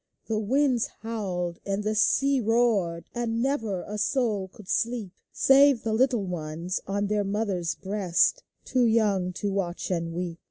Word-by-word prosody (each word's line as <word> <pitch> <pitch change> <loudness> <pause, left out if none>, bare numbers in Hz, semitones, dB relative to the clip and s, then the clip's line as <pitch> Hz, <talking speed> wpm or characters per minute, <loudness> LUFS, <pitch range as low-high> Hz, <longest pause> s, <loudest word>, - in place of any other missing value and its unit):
The 220 -1 -1
winds 255 +2 +2
howled, 185 -6 -3
and 200 +1 -2
tlie 215 +1 -1
sea 275 +5 +3
roared. 215 -7 +1
And 235 -1 -2
never 225 -8 -1
a 210 0 -5
soul 215 -4 0
could 190 +1 -15
sleep. 230 -4 -1 0.2
Save 275 -2 +5
the 220 - -1
little 240 -3 +2
ones 170 +1 -4
on 200 +1 -1
their 210 0 0
mothers' 195 -5 -1
breasts, 195 - +1 0.2
Too 255 -2 +2
young 210 -5 +2
to 200 +2 -2
watch 185 -2 -3
and 170 -2 -1
weep. 170 0 -4
210 Hz, 155 wpm, -26 LUFS, 180-230 Hz, 0.2 s, Save